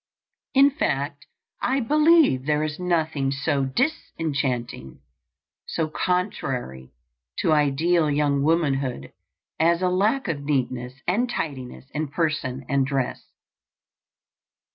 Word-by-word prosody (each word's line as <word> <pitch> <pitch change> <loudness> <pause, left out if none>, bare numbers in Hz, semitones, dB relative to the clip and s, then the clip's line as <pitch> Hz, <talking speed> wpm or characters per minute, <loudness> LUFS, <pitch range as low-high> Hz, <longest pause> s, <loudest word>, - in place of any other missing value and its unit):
In 275 +1 +7
fact, 145 - -2 0.3
I 265 +2 +1
believe 300 - +4
there 150 0 +2
is 155 +1 -4
nothing 160 -6 0
so 140 0 0
disenchanting, 135 - -2 0.7
so 160 -1 -1
contrary 135 - -2 0.5
to - - +1
ideal 155 +3 +2
young 145 -1 +1
womanhood 140 - 0 0.5
as 170 +3 +3
a 180 - +3
lack 205 +9 +1
of 155 -5 -2
neatness 130 -3 -1
and 230 +8 +1
tidiness 135 - -5
in 155 +1 -2
person 140 -4 -2
and 140 0 +2
dress. 135 -2 -2
150 Hz, 105 wpm, -24 LUFS, 135-175 Hz, 0.7 s, In